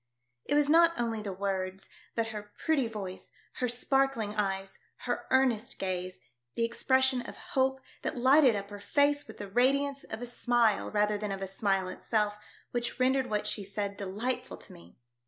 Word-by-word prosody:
It - - +1
was 295 -1 +4
not 335 +1 +5
only 230 -2 -1
the 205 -2 -4
words, 190 0 -3 0.3
but 230 -1 0
her 210 -1 -7
pretty 290 -6 +3
voice, 195 -4 -7 0.3
her 250 - 0
sparkling 245 -3 +1
eyes, 195 -2 -2 0.3
her - - -2
earnest 260 -5 +2
gaze, 185 -2 -3 0.4
the 230 - +2
expression 260 +2 +2
of - - -10 0.2
hope 265 0 +2 0.2
that - - -3
lighted 260 0 +6
up 200 0 -5
her 205 - -7
face 285 +6 +2
with - - -11
the 205 - -6
radiance 275 +6 +2
of 220 +2 -6
a - - -2
smile 240 -3 +2
rather 210 0 +1
than 210 -1 -3
of 195 0 -3
a - - -3
smile 195 -1 0
itself, 210 +2 -1 0.3
which 240 0 -3
rendered 260 0 +2
what 210 -1 0
she 205 - -2
said 200 +1 -3
delightful 230 +7 -3
to - - -12
me. 85 +1 -16
225 Hz, 175 wpm, -30 LUFS, 200-260 Hz, 0.4 s, lighted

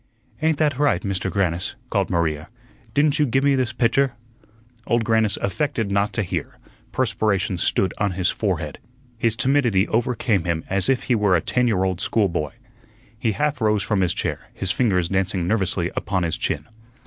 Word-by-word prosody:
"Ain't 160 -1 +2
that 145 -3 +1
right, 145 -12 +2
Mister 95 -1 -2
Grannis?" 90 -3 -1 0.2
called - - +1
Maria; 80 -3 -1 0.5
"didn't 150 +1 +3
you 150 - +3
gi' 135 +3 +2
me 140 0 +3
this 130 -3 +1
pitcher?" 130 +2 +2 0.7
Old 120 -1 +2
Grannis 110 -2 +2
affected 115 -2 -1
not 100 +1 +1
to 110 - 0
hear; 90 - -4 0.3
perspiration 100 -4 0
stood 95 - +1
on 100 -2 +1
his 90 0 +1
forehead; - - -2 0.4
his 115 -1 +2
timidity 120 -6 +2
overcame 115 -4 +1
him 85 -1 -1
as 95 -1 +2
if 130 -2 +2
he 125 - +1
were 105 -5 +3
a - - +4
ten 125 +7 +1
year 100 -5 +2
old 95 -2 -1
schoolboy. 85 - 0 0.7
He 115 -2 +1
half 145 +2 -1
rose 105 -2 +2
from 105 -3 0
his 90 -3 +1
chair, - - -3
his 95 - -1
fingers 90 -9 +1
dancing 95 -2 0
nervously 95 -4 0
upon 95 -3 -1
his 80 -2 0
chin. - - -2
105 Hz, 175 wpm, -22 LUFS, 95-120 Hz, 0.7 s, a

